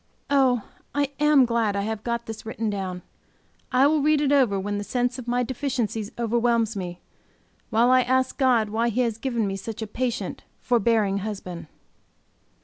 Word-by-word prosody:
Oh, 260 -5 +3 0.3
I 285 -1 +1
am 295 -3 +5
glad 230 -3 0
I 200 - 0
have 220 0 -4
got 235 0 -2
this 220 -1 -7
written 220 -1 -3
down! 185 -3 -4 0.7
I 255 +2 +5
will 300 +1 +3
read 305 +1 +3
it 285 -1 +1
over 250 -9 +3
when 205 +1 -2
the - - -3
sense 245 +3 -1
of 245 - -9
my 245 +1 +1
deficiencies 235 -4 -2
overwhelms 235 -1 +1
me, 180 -2 -5 0.7
while 235 +2 +3
I 255 0 +6
ask 260 +1 +1
God 245 -6 +3
why 230 +3 +1
He 235 +3 0
has 230 -3 -1
given 235 -3 -1
me 195 -1 -2
such 220 +3 -6
a - - -3
patient, 240 +3 -3 0.2
forbearing 220 -4 +2
husband. 190 -5 -6
235 Hz, 175 wpm, -25 LUFS, 210-255 Hz, 0.7 s, I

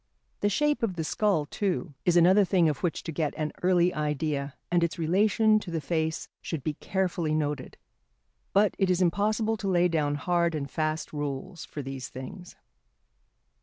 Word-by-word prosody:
The 205 - +2
shape 295 +8 +1
of 215 -6 0
the 165 - -2
skull, 185 -2 +1
too, 180 -1 -2
is 175 -1 +4
another 185 +4 +6
thing 180 -2 +3
of 150 - 0
which 175 -3 -1
to 165 - -4
get 150 -1 -1
an 155 -1 -2
early 180 -1 +3
idea, 150 -2 -2 0.2
and 175 -1 +3
its 170 - -1
relation 210 +6 +3
to 200 - -8
the 165 -1 -1
face 160 +1 -2
should 160 -6 -4
be 155 - -1
carefully 175 -2 -1
noted. 150 -3 -2 0.7
But 205 0 +4
it 190 -2 +2
is 180 -1 +2
impossible 215 +5 +1
to 205 - -4
lay 180 -2 +4
down 150 -4 0
hard 170 +2 +1
and 140 -2 -3
fast 155 +1 -2
rules 145 +4 -4
for 145 - -6
these 135 -1 -6
things. 175 +8 -9
170 Hz, 175 wpm, -28 LUFS, 150-190 Hz, 0.7 s, another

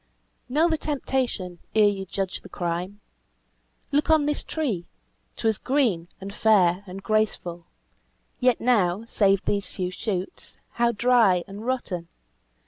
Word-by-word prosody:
"Know 305 +6 +3
the 320 -2 0
temptation 255 - -2 0.2
ere 215 -1 +6
you 195 -2 -2
judge 190 0 -3
the - - -13
crime! 180 +3 -3 0.9
Look 295 +2 +1
on 315 -2 +5
this 295 0 +1
tree 230 - -2 0.5
'twas 220 -3 +1
green, 240 -12 +1
and 195 +1 -7
fair, 195 -4 +3
and 190 +1 -8
graceful; 190 -6 -1 0.7
Yet 250 -1 +3
now, 215 -4 +2
save 200 -3 +2
these 200 -2 0
few 180 -1 -4
shoots, 185 -1 -4
how 235 0 +2
dry 225 -6 +4
and 205 +4 -8
rotten! 190 -10 -2
205 Hz, 135 wpm, -25 LUFS, 185-250 Hz, 0.9 s, ere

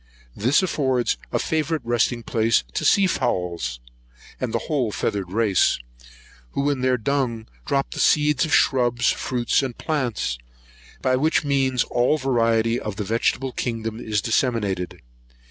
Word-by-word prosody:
This 130 - +2
affords 130 -8 +1 0.2
a - - +1
favourite 160 0 -1
resting 120 0 +1
place 115 - +2
to - - -2
sea 200 - +4
fowls, 85 - -1 0.6
and 125 - -2
the 115 - +1
whole 135 -8 0
feathered 95 -3 -2
race, 105 -2 +2 0.8
who 140 +1 +1
in 135 -3 -2
their 130 0 +2
dung 120 -2 -1 0.2
drop 140 -1 0
the - - -6
seeds 150 -2 +3
of 160 - -2
shrubs, 120 -2 +3
fruits, 120 0 0
and 130 -3 -4
plants; 120 - -2 0.6
by 130 0 +3
which 155 +5 +2
means 135 -3 +2
all 125 +5 +1
the 140 - -10
variety 115 -2 +2
of 105 -2 -5
the 105 - -3
vegetable 115 +5 0
kingdom 115 -2 -3
is 105 -3 -1
disseminated. 110 - -1
120 Hz, 145 wpm, -23 LUFS, 110-135 Hz, 0.8 s, sea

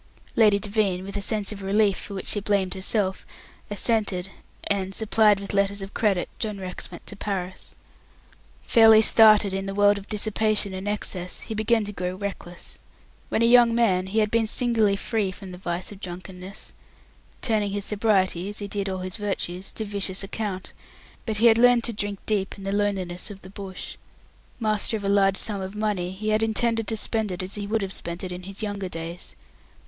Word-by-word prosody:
Lady 210 -3 +5
Devine 200 -3 0
with 195 +1 -6
a 205 - -1
sense 210 0 -1
of 205 -1 -7
relief 200 +1 +2
for 200 - -8
which 190 - -5
she 205 - +3
blamed 200 -2 0
herself 190 0 -1 0.5
assented, 205 -3 0 0.3
and 195 -1 -1
supplied 215 -2 +3
with 200 0 -5
letters 200 0 +1
of 195 - -9
credit, 200 -5 +1
John 215 -2 -3
Rex 185 -1 -6
went 175 - -11
to 205 - -7
Paris. 190 -3 -5 0.9
Fairly 220 -1 +7
started 215 -3 +8
in 195 0 -3
the 195 - -4
world 205 0 +4
of 195 - -13
dissipation 215 -1 +1
and 190 +2 -5
excess, 185 -3 -2
he 225 - -6
began 220 0 +1
to 205 - -5
grow 180 -2 -4
reckless. 185 -3 -7 0.5
When 230 - +1
a - - +5
young 235 -1 +6
man, 190 -6 +2
he 200 +4 -4
had 215 -1 +2
been 230 -1 +2
singularly 225 -3 +2
free 200 -1 -1
from 185 0 -10
the 180 - -9
vice 175 +1 -3
of 200 - -10
drunkenness; 185 +1 -8 0.7
turning 215 -4 +1
his 200 0 -3
sobriety 200 -4 +1
as 205 - -7
he 205 - -4
did 200 -1 -3
all 185 -1 -3
his 185 +2 -4
virtues 195 -3 -4
to 220 - -4
vicious 200 -2 -1
account; 195 -2 -4 0.5
but 220 -1 -1
he 225 - +3
had 230 -1 +7
learnt 245 -1 +5
to 235 - 0
drink 205 -1 -3
deep 205 -3 -1
in 195 - -10
the 195 0 -2
loneliness 195 -3 -1
of 195 -2 -11
the 190 - -11
bush. 195 -2 -7 0.6
Master 215 0 +1
of 205 - -9
a 200 - 0
large 195 -1 +3
sum 205 -3 -2
of 190 +2 -6
money, 210 -4 -1
he 210 +3 -4
had 215 0 +2
intended 225 0 0
to 225 - -2
spend 220 -1 -2
it 180 +1 -4
as 185 - -7
he 205 -1 -4
would 220 0 0
have 190 0 -4
spent 170 +1 -6
it 185 - -4
in 180 0 -6
his 195 +3 -8
younger 200 -3 -3
days. 165 +1 -7
200 Hz, 200 wpm, -25 LUFS, 190-215 Hz, 0.9 s, started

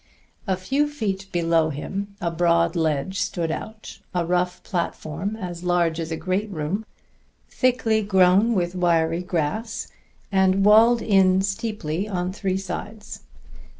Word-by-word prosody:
A 190 -1 +1
few 270 +11 0
feet 200 -9 -3
below 165 -2 +2
him 195 +7 -5
a 170 -1 -1
broad 170 0 +2
ledge 160 +3 0
stood 170 -3 -1
out, 220 +5 -7 0.2
a 175 -1 +1
rough 180 +1 -1
platform 170 +2 -3
as 180 -5 -6
large 175 -2 +1
as 165 -1 -3
a 160 - -2
great 190 +5 -1
room, 190 +5 -3 0.6
thickly 240 -4 +1
grown 195 +3 +4
with 175 -2 0
wiry 170 -2 +1
grass 180 +6 -3 0.4
and 190 0 +3
walled 225 +3 +6
in 190 -2 +4
steeply 200 -4 -3
on 180 -1 -2
three 190 -2 -1
sides. 205 +3 -7
185 Hz, 135 wpm, -23 LUFS, 170-205 Hz, 0.6 s, walled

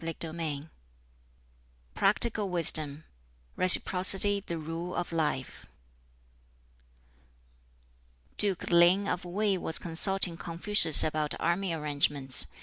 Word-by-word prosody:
] - - -14
BOOK 165 0 -5
XV 155 -2 -7 1.2
Practical 210 +1 -1
Wisdom 155 -4 +3 0.5
Reciprocity 190 +2 +4
the 170 -4 -7
Rule 165 +3 -8
of 175 - -5
Life 150 -5 -5 2.7
Duke 195 -4 -1
Ling 175 +4 +2
of 180 - -5
Wei 195 +2 -3
was 160 - 0
consulting 175 +1 -2
Confucius 170 -1 +2
about 155 -1 -3
army 175 +2 -3
arrangements. 145 -4 -1
170 Hz, 95 wpm, -27 LUFS, 155-190 Hz, 2.7 s, Reciprocity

